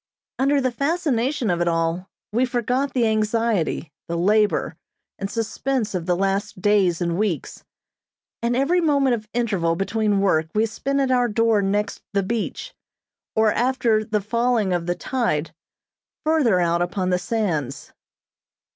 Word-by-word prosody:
Under 280 +2 +3
the 255 -2 0
fascination 275 - 0
of 175 0 0
it 175 - +1
all 165 +2 -1 0.2
we 235 +4 +2
forgot 250 +2 -1
the 245 -2 +3
anxiety, 215 -7 0 0.2
the 170 - -2
labor, 210 +4 +2 0.4
and 195 - -3
suspense 230 +2 -2
of 180 -2 -3
the 180 - +2
last 195 +2 -1
days 195 -3 +2
and 170 +1 -1
weeks, 195 -9 -2 0.8
and 235 +1 0
every 310 +8 +2
moment 280 -5 +3
of 215 -2 -4
interval 195 -9 0
between 205 +2 0
work 160 -5 +2
we 215 +1 +3
spent 275 +5 -1
at 265 -1 +1
our 245 -1 +3
door 225 -1 +2
next 205 +2 -1
the 200 -1 +1
beach, 225 +3 -3 0.6
or 220 -1 +3
after 240 -3 +1
the 215 -1 -1
falling 230 -2 +1
of 175 -1 -2
the 175 - 0
tide, 165 - -1 0.7
further 290 - +3
out 170 0 +1
upon 180 +1 -1
the 180 - +2
sands. 175 - -2
215 Hz, 150 wpm, -22 LUFS, 180-245 Hz, 0.8 s, Under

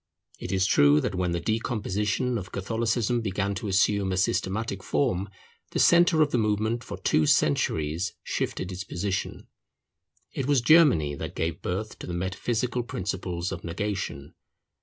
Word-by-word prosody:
It 90 - -5
is 95 -1 +2
true 70 -4 +5
that 90 - -2
when 90 -1 -1
the 85 - -1
decomposition 110 +2 -1
of 90 -2 -9
Catholicism 115 +3 0
began 100 -1 -1
to 100 +2 -5
assume 100 0 +2
a 95 - -1
systematic 100 +3 -1
form, 100 -8 0 0.4
the - - 0
centre 170 -2 +5
of 145 - -2
the 120 - +2
movement 110 +2 0
for - - -7
two 75 -1 +2
centuries 80 +4 +1
shifted 95 - -3
its 95 +1 -5
position. 95 0 -3 0.9
It 135 - -3
was 145 -4 +3
Germany 120 - +5
that - - -6
gave 80 -1 -2
birth 105 +5 -4
to - - -8
the 90 - -4
metaphysical 115 +7 -1
principles 90 -5 -4
of 85 -3 -6
negation. 85 -5 -4
100 Hz, 155 wpm, -26 LUFS, 90-115 Hz, 0.9 s, true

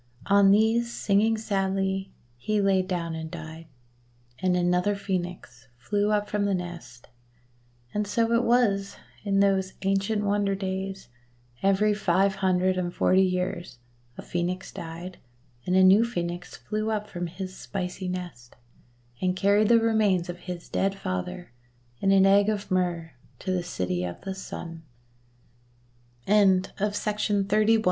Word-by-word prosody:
On 200 0 +5
these, 225 +3 +3
singing 220 +1 +2
sadly, 195 -2 -1 0.2
he 210 - -1
lay 195 -1 +3
down 175 -3 -3
and 160 0 -5
died; 160 0 -9 0.7
and 180 -1 +1
another 180 +3 +1
Phoenix 175 -10 -5
flew 205 - 0
up 210 -1 +1
from 210 -1 -1
the 200 -1 +1
nest. 170 -9 -8 0.8
And 210 0 -1
so 230 +2 +1
it 235 - +4
was, 225 -5 +2 0.3
in 200 -1 +2
those 190 -1 +2
ancient 195 +2 0
wonder 200 -1 +1
days, 190 -3 -4 0.5
every 195 +2 +3
five 195 -1 +2
hundred 185 -1 +1
and 175 -1 -2
forty 185 +2 +3
years 180 -5 -1 0.4
a - - -7
Phcenix 180 +2 -3
died, 170 +2 -8 0.5
and 180 - +2
a 190 - +6
new 190 +3 +7
Phcenix 175 -6 -3
flew 215 +1 -3
up 210 -1 -2
from 175 0 -4
his 185 +2 -7
spicy 185 -1 -5
nest, 175 -10 -6 0.7
and 185 0 +1
carried 200 +2 +3
the 235 - +7
remains 215 -6 +2
of 175 0 -6
his 180 -1 -7
dead 195 0 0
father 120 - -5 0.5
in 195 - +2
an 195 -1 +6
egg 200 +1 +5
of 210 -2 -3
Myrrh 175 -3 -1 0.2
to 185 - -4
the 185 -1 0
City 90 - -2
of 90 -1 -5
the 195 - -5
S 190 0 -7
190 Hz, 140 wpm, -26 LUFS, 175-200 Hz, 0.8 s, new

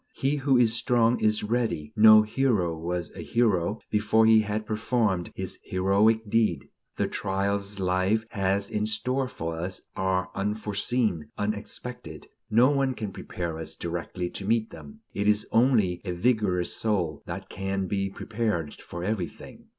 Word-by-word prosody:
He 140 +2 0
who 135 -2 +3
is 115 -2 +4
strong 115 0 +2
is 110 0 +2
ready; 110 -6 -1
no 110 -1 +8
hero 110 -7 +1
was 85 +1 -3
a - - -9
hero 105 -4 +1
before 110 +1 +3
he 110 0 +7
had 105 0 -2
performed 110 -4 0
his 95 -1 -4
heroic 100 +4 +2
deed. 105 -8 +1 0.3
The - - 0
trials 100 0 -2
life 95 +4 +1
has 100 0 0
in 105 0 0
store 130 +4 0
for 80 -8 -5
us 90 +3 -5
are 95 -1 0
unforeseen, 105 -3 -1
unexpected; 105 -4 -5 0.2
no 120 +5 +5
one 135 -2 +1
can 105 -4 -5
prepare 85 -3 -5
us 80 0 -6
directly 85 +1 -4
to - - -6
meet 110 +2 0
them; 215 +1 -12
it 100 0 -1
is 105 0 +3
only 110 -7 +3
a 90 -3 -3
vigorous 95 -3 +1
soul 90 -9 -1
that - - -6
can 95 0 -3
be 100 +1 -1
prepared 105 -6 -2
for 85 0 -8
everything. 95 -6 -5
105 Hz, 150 wpm, -27 LUFS, 90-110 Hz, 0.3 s, no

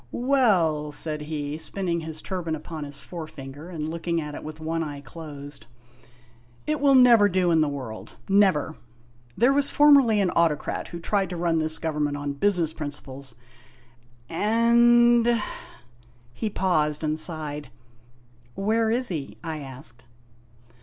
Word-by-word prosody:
" - - -33
Well," 190 - +2
said 150 +1 -1
he, 150 0 -4
spinning 170 +1 -2
his 160 -1 -6
turban 175 -4 -3
upon 155 0 -7
his 140 -1 -8
forefinger 155 -2 -9
and 155 -4 -4
looking 170 0 -2
at 150 -2 -5
it - - -7
with 155 0 -8
one 165 +1 -2
eye 145 -3 -5
closed, 145 0 -9 0.5
" 120 0 -30
it 305 -1 -1
will 280 -1 +4
never 235 -5 +7
do 180 -2 +2
in 160 -1 +4
the 155 - +2
world 130 -6 -7
never! 190 -6 +3 0.6
There 245 +4 +4
was 285 0 +2
formerly 280 -7 +5
an 190 -3 +2
autocrat 165 -3 0
who 170 - -7
tried 195 +3 0
to 180 - -5
run 165 -1 +1
this 155 0 -1
gov 160 -2 -3
ernment 145 -1 0
on 145 0 -3
business 170 0 +1
principles, 140 -4 -8 0.9
and 235 - +4 0.5
" 120 0 -30
he 215 - -3
paused 155 -7 0
and 155 0 0
sighed. 150 -4 -3 0.9
"Where 220 +3 +1
is 245 +3 0
he?" 155 -7 -5
I 160 -2 -4
asked. 130 -3 -8
160 Hz, 155 wpm, -25 LUFS, 145-200 Hz, 0.9 s, never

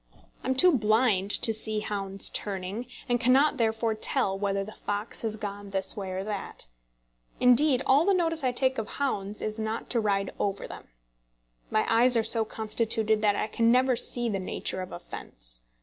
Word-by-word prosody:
I - - -5
am 260 - +1
too 350 +4 +5
blind 215 -3 +2
to 225 +2 +4
see 215 0 +1
hounds 195 -2 0
turning, 200 +4 -4 0.2
and 245 -1 +1
cannot 265 +5 +3
therefore 225 -1 0
tell 200 -2 -1
whether 195 0 -1
the 210 - -9
fox 205 +1 -4
has 220 -2 -2
gone 205 -1 -6
this 190 -1 -1
way 195 -2 -5
or 185 +1 -4
that. 205 -1 -6 0.7
Indeed 250 +2 +4
all 280 +4 +4
the 395 +2 +3
notice 330 -3 0
I 255 - +2
take 260 0 0
of 220 - -4
hounds 210 -7 -2
is 215 +1 -4
not 220 +1 -4
to 240 - +1
ride 200 -2 0
over 200 -1 -2
them. - - -10 0.8
My 215 - +1
eyes 240 +2 +5
are 225 - +2
so 225 0 +5
constituted 220 0 -1
that 205 -1 +2
I - - -1
can 230 +1 +1
never 255 +1 +3
see 240 0 -1
the 200 -4 -2
nature 185 0 -3
of 185 0 -7
a - - -6
fence. - - -8
220 Hz, 190 wpm, -27 LUFS, 200-245 Hz, 0.8 s, too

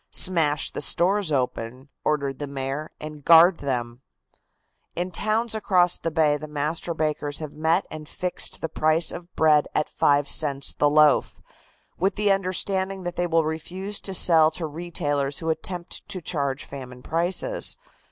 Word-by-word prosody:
"Smash 160 -5 +3
the - - -5
stores 190 0 +2
open," 125 -1 -3
ordered 140 -3 -1
the 145 - -4
Mayor, 140 +2 -4
"and 150 -1 -9
guard 170 +2 +7
them." 120 -3 -3 0.9
In 180 +1 -3
towns 215 +6 0
across 185 -5 +2
the 165 - -2
bay 155 -2 +2
the 155 +1 -8
master 155 +3 -3
bakers 150 -2 -2
have 155 -2 -6
met 160 +4 +1
and 155 -1 -9
fixed 180 -1 -4
the - - -1
price 155 +1 +1
of 175 +1 -9
bread 155 -2 +4
at - - +1
5 145 0 +2
cents 140 -3 +1
the 145 - +2
loaf, 150 -1 +3 0.6
with 195 +2 +1
the 210 -1 +2
understanding 190 0 0
that 175 0 -4
they 175 - -1
will 165 -1 +2
refuse 185 +6 -4
to 195 - -1
sell 160 -3 +6
to 165 +1 -5
retailers 145 -3 -3
who 160 -1 -1
attempt 175 +4 -6
to 195 -3 -3
charge 140 -5 -2
famine 125 -2 -10
prices. 180 - 0
160 Hz, 160 wpm, -24 LUFS, 145-180 Hz, 0.9 s, guard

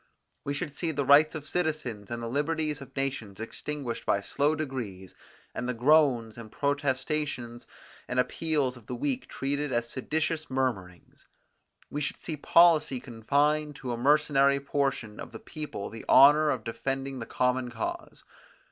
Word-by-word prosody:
We 140 - -2
should 145 0 -4
see 170 - -2
the 145 -3 -1
rights 150 +4 +6
of 150 -1 -6
citizens, 150 - -2
and 120 0 -4
the - - -3
liberties 150 +3 -1
of 135 0 -12
nations 130 -8 -3
extinguished 125 +2 -5
by 100 - +2
slow 145 +8 +1
degrees, 120 -11 -5 0.4
and 125 - -3
the 125 - -1
groans, 125 -4 +3
and 110 -2 -10
protestations 140 -3 -2 0.4
and 125 - -1
appeals 140 -2 0
of 115 - -17
the 125 - -4
weak 130 0 -2
treated 140 +1 -2
as 120 -1 -1
seditious 155 +4 -2
murmurings. 115 -10 -3 0.6
We 145 - -3
should 140 - -2
see 160 - -5
policy 155 -3 +4
confine 145 +6 0
to 130 -3 -6
a - - -1
mercenary 140 +1 +3
portion 135 -6 -2
of - - -8
the 110 - -7
people 150 -11 -6
the 110 0 -9
honour 150 +3 +7
of - - -1
defending 135 +3 -3
the 115 - -6
common 125 0 0
cause. 115 -2 -5
135 Hz, 155 wpm, -28 LUFS, 120-150 Hz, 0.6 s, honour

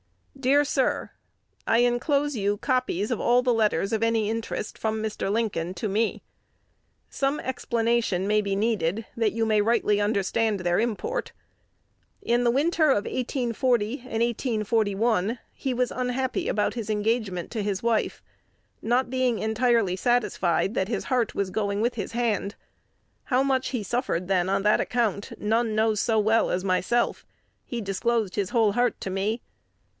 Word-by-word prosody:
Dear 275 +2 +3
Sir, 275 -2 0 0.6
I 230 - +4
enclose 280 +4 +1
you 205 -1 0
copies 250 -4 -1
of 240 - -1
all 245 +1 +3
the 250 -1 +3
letters 210 -3 +1
of 220 - 0
any 230 -2 +2
interest 225 -1 -4
from 220 0 -2
Mr. 215 -2 -2
Lincoln 195 -6 -1
to 185 - -3
me. 215 +3 -1 0.8
Some 275 +2 -1
explanation 235 -6 0
may 210 0 +3
be 200 -1 -2
needed, 210 -1 0
that 225 -2 +1
you 225 0 0
may 215 -1 +3
rightly 210 -2 +2
understand 205 0 0
their 175 -1 +1
import. 240 - -2 0.9
In 240 +1 +2
the 240 - +3
winter 310 +6 +2
of 205 -6 +2
1840 245 -2 0
and 235 -2 -2
1841 225 -2 0 0.2
he 265 -3 -3
was 250 0 0
unhappy 255 +1 -2
about 210 - 0
his 225 -3 -5
engagement 210 -4 -1
to 225 - -2
his 200 -1 -2
wife, 230 -2 0 0.6
not 245 +2 +1
being 255 -3 +1
entirely 220 -3 +1
satisfied 195 -4 +1
that 190 - 0
his 225 - -2
heart 250 -3 0
was 195 -2 -1
going 200 -1 -1
with 240 +2 +1
his 225 0 -5
hand. 225 -4 -1 0.7
How 255 0 +2
much 265 -1 +1
he 250 -4 -3
suffered 195 -6 -2
then 185 -1 +1
on 195 0 +1
that 210 0 +4
account, 220 -5 -1
none 220 +1 0
know 220 0 +3
so 220 +2 +1
well 220 +2 +3
as 180 - -1
myself: 195 +6 0 0.4
he 240 - -5
disclosed 210 0 -1
his 200 -3 -1
whole 225 -4 +3
heart 245 +3 +1
to 190 - -4
me. 205 +5 -1
225 Hz, 160 wpm, -26 LUFS, 205-245 Hz, 0.9 s, I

